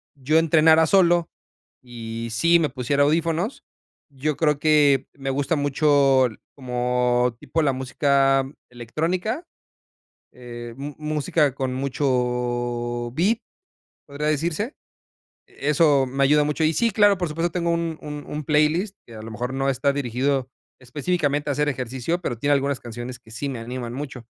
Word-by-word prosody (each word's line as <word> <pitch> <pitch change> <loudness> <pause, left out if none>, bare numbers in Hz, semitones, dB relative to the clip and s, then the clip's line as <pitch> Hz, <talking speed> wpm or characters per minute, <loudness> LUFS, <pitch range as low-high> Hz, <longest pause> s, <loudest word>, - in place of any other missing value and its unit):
yo 145 +3 +1
entrenara 160 0 +5
solo 175 -2 +3 0.5
y 115 -2 -7
si 170 +9 +4
me 155 - +2
pusiera 140 +2 0
audífonos, 165 - 0 0.5
yo 140 +2 -2
creo 150 -3 +2
que 145 -3 +3
me 135 -1 -5
gusta 140 +4 0
mucho 140 -2 +3 0.3
como 125 -1 0
tipo 160 - -1
la 140 -3 +2
música 135 +1 +2 0.2
electrónica, 165 - -3 0.9
eh, 120 -1 -9
mu 140 +1 -6
música 150 -2 0
con 130 -1 -2
mucho 125 -3 -1
beat, 200 - +1 0.7
podría 145 +2 -3
decirse. 170 - -1 0.7
Eso 145 -1 +2
me 135 +2 0
ayuda 150 +2 +4
mucho. 150 +1 -1
Y 155 +1 +3
sí, 230 +9 +2
claro, 205 -1 +4
por 175 - 0
supuesto, 165 +3 -1
tengo 170 0 -1
un 165 -1 -2
un 150 -1 -7
un 150 0 -5
playlist 155 +7 +1
que 115 - -14
a 110 - -8
lo 115 - -8
mejor 125 +4 -4
no 135 +1 0
está 140 +1 +1
dirigido 130 0 -1 0.3
específicamente 145 +2 -1
a - - +1
hacer 150 +1 +1
ejercicio, 130 +6 -3
pero, 120 -8 -3
tiene 145 +5 0
algunas 140 -1 0
canciones 120 +1 -7
que 110 - -18
sí 125 +6 -4
me 130 -4 -4
animan 120 0 -6
mucho, 130 -3 -7
140 Hz, 150 wpm, -23 LUFS, 125-155 Hz, 0.9 s, entrenara